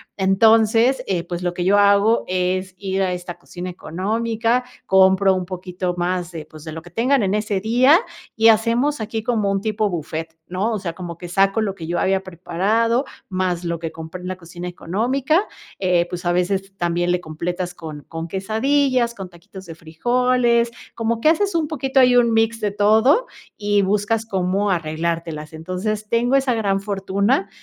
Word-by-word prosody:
Entonces, 225 +5 +4
eh, 180 -3 -1
pues 175 0 -5
lo 175 -1 -2
que 175 - -2
yo 200 +2 +4
hago 200 +3 +4
es 185 +1 -1
ir 195 0 -2
a 185 -1 +1
esta 175 -1 -7
cocina 180 +1 -7
económica, 225 +8 -1 0.2
compro 190 0 +5
un 185 -1 -2
poquito 180 -1 -4
más 175 0 -1
de, 160 -3 -7
pues 155 0 -13
de 160 - -6
lo 160 +1 -8
que 175 - -14
tengan 250 - +2
en 195 0 0
ese 210 -1 0
día 250 - +5 0.4
y 225 0 +5
hacemos 230 +6 +2
aquí 220 +1 -3
como 220 -4 0
un 195 0 0
tipo 215 0 0
bufet, 160 -1 -5
¿no?, 190 +5 -1
o 215 - -2
sea, 175 -4 -4
como 170 -1 -7
que 175 - -8
saco 195 +4 +2
lo 205 -3 -1
que 165 -4 -8
yo 175 +1 -1
había 190 0 +1
preparado 200 - 0 0.2
más 185 -2 -1
lo 170 -1 -2
que 165 -1 -4
compré 165 +3 -8
en 180 - -7
la 185 - -3
cocina 175 0 -9
económica, 255 - 0 0.3
eh, 180 -2 +2
pues, 175 0 -6
a 175 - +2
veces 195 +2 -1
también 175 0 0
le 180 0 0
completas 175 +3 -4
con 155 -4 -8
con 165 0 -5
quesadillas, 235 - +1
con 195 -3 -7
taquitos 190 +2 -13
de 165 -2 -9
frijoles, 235 +8 +1 0.2
como 230 0 -1
que 310 - +5
haces 390 +3 +1
un 320 -2 +1
poquito 270 -3 0
ahí 250 -1 +5
un 235 -2 +4
mix 225 0 +2
de 210 -2 -1
todo 220 - +3 0.3
y 205 -1 +2
buscas 210 +3 0
cómo 195 0 0
arreglártelas. 165 -2 -3
Entonces 185 +6 -4
tengo 240 +3 +2
esa 270 -2 +2
gran 200 -4 0
fortuna, 200 +2 0
195 Hz, 185 wpm, -21 LUFS, 175-225 Hz, 0.4 s, compro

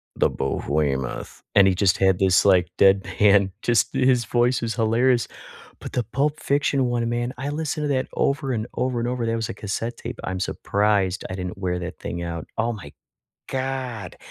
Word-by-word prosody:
the - - +3
Behemoth," 70 -1 -2
and 100 -1 +7
he 95 - +4
just 95 0 +2
had 95 -1 +3
this, 95 0 +4
like, 90 -2 +5
deadpan. 100 0 +4
Just 120 -2 +2
his 125 -3 +3
voice 120 +1 +2
is 115 -1 -2
hilarious, 120 +2 +2 0.5
but - - -8
the 125 - 0
Pulp 145 +7 -1
Fiction 140 -1 +1
one, 120 -1 0
man, 120 +1 -2
I 140 +2 -3
listen 155 +1 -2
to 145 - -1
that 130 -1 0
over 140 -1 0
and 110 -1 -2
over 125 -1 -1
and 120 - -1
over, 125 -2 -2
that 115 0 0
was 115 -1 -3
a - - -3
cassette 110 +4 -4
tape, 120 0 -7
I'm 95 0 -3
surprised 100 -1 0
I - - -3
didn't 90 0 -5
wear 90 -2 -2
that 90 0 -6
thing 85 0 -5
out. 85 -1 -4
Oh, 115 +1 +1
my 75 -9 -10 0.6
god, 130 -7 -4
115 Hz, 190 wpm, -23 LUFS, 95-125 Hz, 0.6 s, and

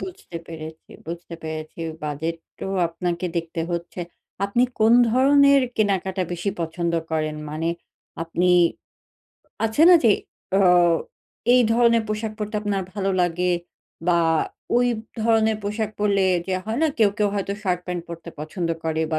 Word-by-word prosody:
বুঝতে 185 -2 -8
পেরেছি 160 -1 -9 0.2
বুঝতে 170 0 -7
পেরেছি 155 +1 -6 0.2
বাজেট 155 +3 -3 0.2
তো - - -3 0.2
আপনাকে 170 +1 -3
দেখতে 165 0 -3
হচ্ছে। 170 +1 -4 0.4
আপনি 200 +5 +1 0.2
কোন 220 +2 +5 0.2
ধরনের 280 +3 +5 0.2
কেনাকাটা 190 -3 0
বেশি 175 +3 -2
পছন্দ 170 +1 -2 0.2
করেন? 155 -1 -1
মানে 160 +2 -2 0.5
আপনি 175 +2 +1 1.1
আছে 225 +7 +2
না 360 - +9
যে 220 - +7 0.5
অও 180 -2 +5 0.6
এই 250 - +6
ধরনের 235 -1 +4
পোশাক 215 0 -2
পড়তে 210 0 -4
আপনার 200 -2 -1
ভালো 195 -2 0
লাগে 180 +1 +1 0.6
বা 170 -1 +4 0.6
ওই 245 0 +4 0.4
ধরনের 220 -1 +3
পোশাক 210 +1 -2
পড়লে 200 -2 +2 0.2
যে 190 - -1
হয় 220 +3 -2
না 320 - +4
কেউ, 215 -3 +5
কেউ 210 - +3
হয়তো 200 0 -2
শার্ট-প্যান্ট 180 -2 -2
পরতে 170 0 -8
পছন্দ 165 +2 -3 0.2
করে 160 0 0
বা 155 - +2
180 Hz, 140 wpm, -23 LUFS, 165-215 Hz, 1.1 s, না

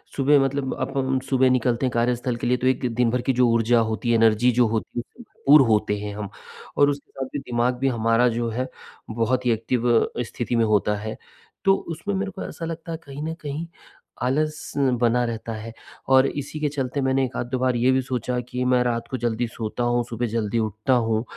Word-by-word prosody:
सुबह 140 +1 +4
मतलब 135 0 -2
अपन 130 0 0
सुबह 130 -1 +4
निकलते 125 0 +1
हैं 130 - 0
कार्यस्थल 120 +1 0
के 120 - -3
लिए, 125 +1 +2
तो 130 - -1
एक 130 0 +1
दिन-भर 125 0 +2
की 135 - 0
जो 125 0 +3
ऊर्जा 115 +1 +3
होती 110 +1 -1
है, - - +4
एनर्जी 115 +2 +4
जो 120 -1 +3
होती 110 +2 -3
उससे 240 - -10 0.2
पूर्ण 145 -1 +8
होते 105 -2 +2
हैं 105 0 -5
हम 105 -1 -5 0.5
और 145 0 +5
उसके 140 -1 -5
साथ 135 - -4
में 145 - -2
दिमाग 120 +1 0
भी 135 - +1
हमारा 115 0 +2
जो 115 0 -1
है, 125 +3 -2 0.4
बहुत 115 +3 0
ही 120 - +3
एक्टिव 115 +2 -1 0.3
स्थिति 120 0 -3
में 115 - +3
होता 105 -1 +2
है। 110 +1 -5 0.5
तो 195 0 +6 0.2
उसमें 170 +5 -4
मेरे 195 +1 -2
को 190 - -7
ऐसा 165 - -6
लगता 165 0 -6
है 165 - -3
कहीं 140 +1 -7
न 160 - -3
कहीं 150 +3 -4 0.6
आलस 155 +4 -1 0.3
बना 120 +1 +3
रहता 115 -1 -4
है 110 +1 -7 0.4
और 130 0 +6
इसी 145 +2 -5
के 150 -1 0
चलते 140 -1 -2
मैंने 135 0 +2
1 125 - -8
आध, 120 - -2
2 130 - -1
बार 130 -1 +1
ये 120 +2 +3
भी 130 0 +2
सोचा 125 -1 -2
कि 125 0 -2
मैं 125 -1 +3
रात 115 -1 -1
को 130 - -3
जल्दी 120 0 -1
सोता 115 +1 -4
हूँ, 120 0 +1
सुबह 120 0 -3
जल्दी 115 0 -1
उठता 110 +4 0
हूँ, 115 -2 +1
125 Hz, 220 wpm, -24 LUFS, 115-135 Hz, 0.6 s, पूर्ण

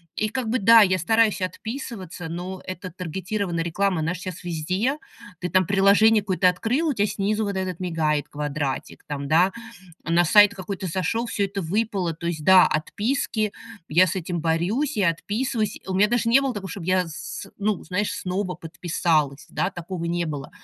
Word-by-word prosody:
И 215 - 0
как 230 +2 -3
бы, 255 +3 +1
да, 225 +3 +8
я 185 -2 +3
стараюсь 220 +3 +2
отписываться, 195 - -5
но 180 +3 -5
это 185 0 -6
таргетированная 180 +1 -3
реклама, 180 +1 0
она 165 +3 -1
ж 180 - -7
щас 185 -3 -7
везде. 185 - -1 0.4
Ты 180 - -3
там 185 0 +3
приложение 200 +4 +5
какое-то 185 -2 +2
открыл, 245 - 0
у - - +1
тя 210 -3 +1
снизу 210 +2 -1
вот 200 -1 -3
этот 185 -2 -3
мигает 160 -5 -1
квадратик 145 -2 -4
там, 140 -1 -4
да. 170 +6 +4 0.5
На 170 +2 +3
сайт 205 +4 +6
какой-то 190 0 -5
сошёл, 190 +7 -1
всё 205 -3 -1
это 195 0 -3
выпало. 195 -1 -1
То 170 +2 -7
есть 160 -3 -3
да, 190 +1 +8
отписки, 215 - -1 0.4
я 175 +5 +5
с 185 - -3
этим 175 -1 -3
борюсь, 175 - 0
я 190 -5 +3
отписываюсь. 215 +6 -2
У 190 - -3
меня 200 +3 +4
даже 240 0 +1
не 260 +4 +6
было 270 -2 -1
такого, 195 -2 -6
чтоб 195 - -7
я 185 0 +2
с 165 +4 -7
ну, 205 -2 -1
знаешь, 190 +4 -1
снова 185 0 -3
подписалась, 160 -3 -1
да, 185 - 0
такого 175 -1 -6
не 170 0 -1
было. 145 -4 -5
185 Hz, 185 wpm, -24 LUFS, 170-210 Hz, 0.5 s, да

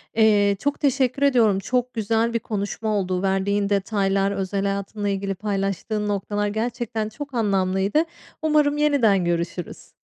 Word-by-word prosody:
Eee, 205 -2 +4
çok 285 +3 -1
teşekkür 270 -2 +1
ediyorum. 230 -8 +4
Çok 250 +5 -1
güzel 225 +1 0
bir 230 - +1
konuşma 215 0 -3
oldu. 185 -2 -1
Verdiğin 200 +1 0
detaylar, 195 -1 +1
özel 195 0 -2
hayatınla 200 +1 -2
ilgili 195 0 -2
paylaştığın 200 +1 -2
noktalar 205 +1 -1
gerçekten 225 0 -2
çok 280 +5 -8
anlamlıydı. 195 - +1 0.4
Umarım 300 -2 +2
yeniden 245 -11 +3
görüşürüz. 170 0 -3
205 Hz, 130 wpm, -23 LUFS, 195-235 Hz, 0.4 s, Eee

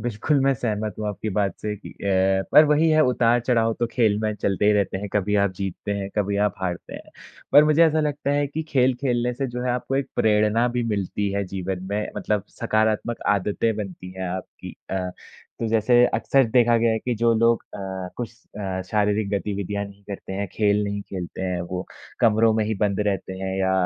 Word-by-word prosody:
बिल्कुल, 120 +5 0
मैं 135 +1 +3
सहमत 110 -4 -2
हूँ 105 - -3
आपकी 105 +1 -4
बात 100 -2 0
से 105 -1 -3
कि 100 - -11
अ, 95 0 +1
पर 155 - +9
वही 150 +2 +3
है 155 0 +4
उतार-चढ़ाव 120 -2 +2
तो 120 - +2
खेल 110 -5 +2
में 110 -1 0
चलते 100 0 0
ही 105 - +6
रहते 100 -2 +1
हैं, 105 - -5
कभी 105 0 0
आप 100 - 0
जीतते 100 +1 -4
हैं, 100 -1 -3
कभी 100 -1 0
आप - - -2
हारते 90 -2 -4
हैं। - - -10 0.4
पर 145 - +8
मुझे 155 +2 +5
ऐसा 160 0 +2
लगता 145 -2 -1
है 145 0 +1
कि 150 +3 -4
खेल 130 -2 +3
खेलने 125 -2 0
से 135 +2 -2
जो 125 0 -5
है 125 - +1
आपको 125 +2 -2
एक 140 - -1
प्रेरणा 105 +2 +3
भी - - +1
मिलती 100 +1 -2
है 100 0 -1
जीवन 95 0 -4
में 105 +1 -1
मतलब 105 0 -1 0.2
सकारात्मक 110 +2 0 0.2
आदतें 105 +3 -1
बनती 95 -3 -6
हैं 95 -1 -3
आपकी 95 +1 -7 0.2
अ, 95 -1 -2 0.5
तो 115 - 0
जैसे 115 +2 +4
अक्सर 135 -1 +3
देखा 120 -1 +4
गया 115 0 +2
है 110 - 0
कि 125 +2 -2
जो 115 +1 +2
लोग 115 +1 +3
अ, 95 -2 -5
कुछ 120 -2 -5 0.3
अ, 95 -2 -3
शारीरिक 105 0 +1
गतिविधियाँ 100 0 -2
नहीं 100 0 -13
करते 100 -1 -7
हैं, 100 +1 -2
खेल 105 -1 +2
नहीं 100 0 -3
खेलते 95 -1 -5
हैं 90 -2 -2
वो, 90 +1 -5 0.4
कमरों 115 -1 +4
में 110 -1 +1
ही 110 +1 -1
बंद 100 -1 0
रहते 95 -2 -2
हैं 95 0 -2
या 95 -1 +1
105 Hz, 210 wpm, -23 LUFS, 100-120 Hz, 0.5 s, पर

